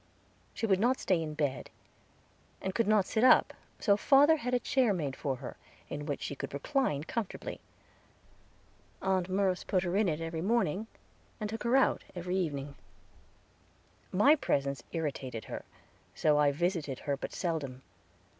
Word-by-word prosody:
She - - -1
would 190 -4 +3
not 250 +5 +2
stay 180 -3 +1
in 155 -1 -4
bed, 145 -4 -2 0.9
and 190 - -3
could 230 +1 +1
not 210 -3 +4
sit 220 +4 0
up, 255 - +6 0.3
so 200 -3 +4
father 285 +8 +5
had 250 -3 -3
a - - +2
chair 245 -3 +2
made 145 -6 -3
for 135 -2 -2
her, 130 0 -8 0.3
in 145 +1 -4
which 145 - -3
she - - -3
could 140 - -6
recline 150 - 0
comfortably. 215 +4 -4 1.4
Aunt 190 -1 +1
Merce 190 -1 +1
put 185 -2 0
her 175 0 -1
in 205 -2 +3
it 155 -1 -2
every 165 0 -4
morning, 210 -1 +1 0.5
and 210 -1 -3
took 225 - -5
her 240 +2 +2
out 270 - +3
every 180 +1 -3
evening. 145 -6 -2 1.4
My 270 +11 +6
presence 140 - -1
irritated 140 -8 -4
her, - - -6 0.5
so 150 -1 +3
I 145 -1 +4
visited 160 -3 -1
her 140 -1 -1
but 140 - -6
seldom. 140 -7 -3
180 Hz, 160 wpm, -31 LUFS, 145-215 Hz, 1.4 s, up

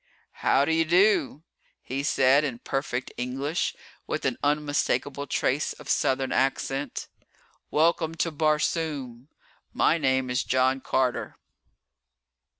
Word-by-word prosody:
"How 140 - +3
do 160 - +1
you 165 0 +3
do?" 170 -3 +2 0.4
he 135 +2 -4
said 140 0 +3
in 135 -5 -3
perfect 135 0 -3
English, 135 +6 -2 0.3
with - - -3
an - - -1
unmistakable 145 -1 0
trace 135 +2 0
of 150 - -14
Southern 130 0 +1
accent. 135 0 -1 0.6
"Welcome 165 +1 +2
to 165 +1 -1
Barsoom! 150 -4 -1 0.5
My 165 - +3
name 130 -3 +1
is 125 +1 0
John 130 +1 +2
Carter." 130 -2 -1
140 Hz, 115 wpm, -26 LUFS, 130-155 Hz, 0.6 s, How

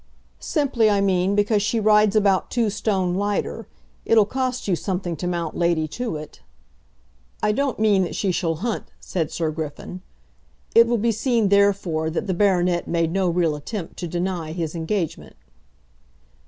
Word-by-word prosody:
"Simply, 270 -8 +1
I 205 -1 +2
mean, 190 0 +1
because 205 0 +2
she 220 +3 0
rides 210 -1 +4
about 200 -3 +2
two 230 -4 0
stone 190 -4 0
lighter. 205 +2 -2 0.4
It'll 220 -2 +4
cost 255 +1 -3
you 185 - +2
something 180 -1 -3
to 180 - -3
mount 170 -2 -3
Lady 170 -2 +1
Tewett." 155 -6 -6 1.0
"I 210 - +3
don't 275 +3 -1
mean 210 -3 +3
that - - -6
she 195 - 0
shall 165 -2 -1
hunt," 230 - -2
said 165 -4 -3
Sir 160 -2 -2
Griffin. 160 +3 -6 0.7
It 230 0 +7
will 240 0 +1
be 230 +2 +1
seen, 225 -1 +1
therefore, 195 -6 +2
that 160 - -3
the 190 - -1
baronet 180 -2 +2
made 165 -1 0
no 190 0 +1
real 170 -3 +1
attempt 165 +4 -6
to 175 - -4
deny 175 -2 -3
his 165 -3 -3
engagement. 165 +1 -3
190 Hz, 160 wpm, -23 LUFS, 170-215 Hz, 1.0 s, It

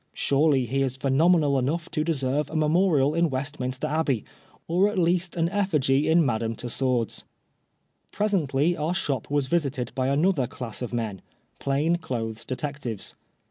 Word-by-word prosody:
Surely 140 -2 +2
he 135 +4 -1
is 135 -1 -1
phenomenal 145 +1 +3
enough 160 +7 -1
to 155 - 0
deserve 145 -2 0
a - - -7
memorial 155 -2 +3
in 170 0 +2
Westminster 130 -1 -3
Abbey, 150 -7 0 0.4
or 185 +5 +3
at 210 - -4
least 175 0 +1
an 165 0 +2
ef&gy 155 -9 +1
at 160 - +5
Madame 115 -7 +1
Tussaud's. 125 -1 -1 0.9
Presently 175 -6 +1
our 160 +3 -1
shop 140 -8 -2
was 145 -1 +1
visited 135 -5 -1
by 130 -1 0
another 145 -1 +2
class 120 -1 -6
of 125 - -4
men 110 -5 -3 0.2
— - - -41
plain 145 +5 +1
clothes 115 -8 -4
detectives. 130 -4 -4
140 Hz, 150 wpm, -26 LUFS, 130-165 Hz, 0.9 s, at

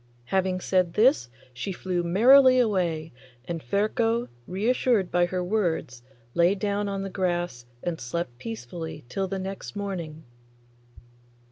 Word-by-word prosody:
Having 185 +4 0
said 180 -3 +1
this 215 - +4 0.2
she 125 +11 -4
flew 180 -1 -2
merrily 255 +9 +6
away, 175 - 0 0.3
and 170 -2 -4
Ferko, 225 - 0 0.2
reassured 210 0 +1
by 175 0 +3
her 180 0 -2
words, 175 - -1 0.3
lay 175 +3 +4
down 205 +1 -1
on 195 0 -3
the 195 - -4
grass 175 -9 -2 0.2
and 170 -2 -3
slept 120 -1 -4
peacefully 130 +7 -7
till 195 +8 -2
the 195 +1 -3
next 190 +1 -6
morning. 175 -6 -5
185 Hz, 130 wpm, -26 LUFS, 165-200 Hz, 0.3 s, merrily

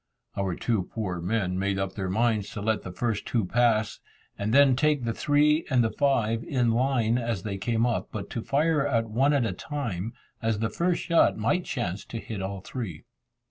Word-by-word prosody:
Our 95 -3 -1
two 105 -4 -1
poor 95 -6 -3
men 90 -1 -1
made 100 0 0
up 95 -1 -2
their 95 -2 -3
minds 110 0 +1
to 105 - -5
let 110 0 +1
the 90 - -7
first 110 +2 -2
two 115 -5 +1
pass, 110 0 +2 0.4
and 100 +2 -2
then 135 0 +6
take 150 0 +2
the 115 -1 -1
three 150 +4 +3
and 130 -4 +3
the 110 - 0
five 115 -3 +1
in 125 -4 +1
line, 120 -1 +2
as 115 -5 -2
they 100 -2 -4
came 115 +3 +1
up, 120 -2 -1
but 100 -2 -5
to 115 - -3
fire 145 +2 +1
at 115 -5 +1
one 135 +6 +3
at 140 -5 +2
a - - -1
time, 115 - -4 0.3
as 115 -2 0
the 115 +2 -1
first 175 0 0
shot 170 -2 +3
might 115 +12 0
chance 100 -5 -3
to 115 - -6
hit 110 -3 -5
all 95 0 -4
three. 95 - -6
115 Hz, 205 wpm, -27 LUFS, 100-130 Hz, 0.4 s, then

